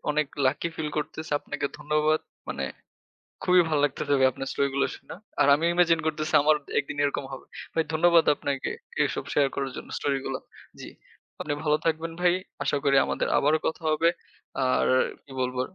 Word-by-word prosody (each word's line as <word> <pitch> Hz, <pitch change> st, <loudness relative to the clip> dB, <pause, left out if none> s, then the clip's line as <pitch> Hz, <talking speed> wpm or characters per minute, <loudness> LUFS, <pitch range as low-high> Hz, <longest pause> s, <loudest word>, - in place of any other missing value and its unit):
অনেক 150 Hz, -1 st, +1 dB, 0.2 s
lucky 150 Hz, +5 st, 0 dB
feel 155 Hz, -1 st, -2 dB
করতেছি। 155 Hz, +1 st, -5 dB
আপনাকে 145 Hz, -1 st, -3 dB
ধন্যবাদ। 150 Hz, +1 st, +1 dB, 0.3 s
মানে 70 Hz, -, -3 dB, 0.8 s
খুবই 180 Hz, 0 st, +6 dB
ভাল 155 Hz, -2 st, +1 dB
লাগতেছে 145 Hz, 0 st, 0 dB
যে 130 Hz, -, +6 dB
আপনার 135 Hz, -, -5 dB
স্টোরিগুলো 140 Hz, 0 st, +1 dB
শুনে। -, -, -11 dB, 0.3 s
আর 140 Hz, -, +5 dB
আমি 160 Hz, +3 st, -1 dB
ইমাজিন 170 Hz, -2 st, +4 dB
করতেছি, 155 Hz, 0 st, -2 dB
আমার 155 Hz, +1 st, +5 dB
অ -, -, -27 dB, 0.2 s
একদিন 140 Hz, +1 st, -3 dB
এরকম 140 Hz, -1 st, -1 dB
হবে। 135 Hz, -, -8 dB, 0.3 s
ভাই 160 Hz, -1 st, +2 dB
ধন্যবাদ 170 Hz, +1 st, +5 dB
আপনাকে, 140 Hz, -2 st, -2 dB, 0.3 s
এসব -, -, -2 dB
শেয়ার 140 Hz, -2 st, +3 dB
করার 135 Hz, -1 st, -2 dB
জন্য -, -, -8 dB
স্টোরিগুলা। 135 Hz, -1 st, -2 dB, 0.4 s
জ্বী। -, -, -8 dB, 0.5 s
আপনি 150 Hz, -, -2 dB
ভালো 150 Hz, -1 st, +3 dB
থাকবেন 165 Hz, +1 st, 0 dB
ভাই। 180 Hz, 0 st, +4 dB, 0.3 s
আশা -, -, +1 dB
করি 140 Hz, -1 st, +4 dB
আমাদের -, -, -1 dB
আবারো 150 Hz, +2 st, +3 dB
কথা 160 Hz, +1 st, -2 dB
হবে। 155 Hz, +2 st, +3 dB, 0.6 s
আর 130 Hz, -, +2 dB, 0.4 s
কি 135 Hz, -, -14 dB
বলবো? 125 Hz, 0 st, -1 dB
150 Hz, 170 wpm, -26 LUFS, 140-160 Hz, 0.8 s, খুবই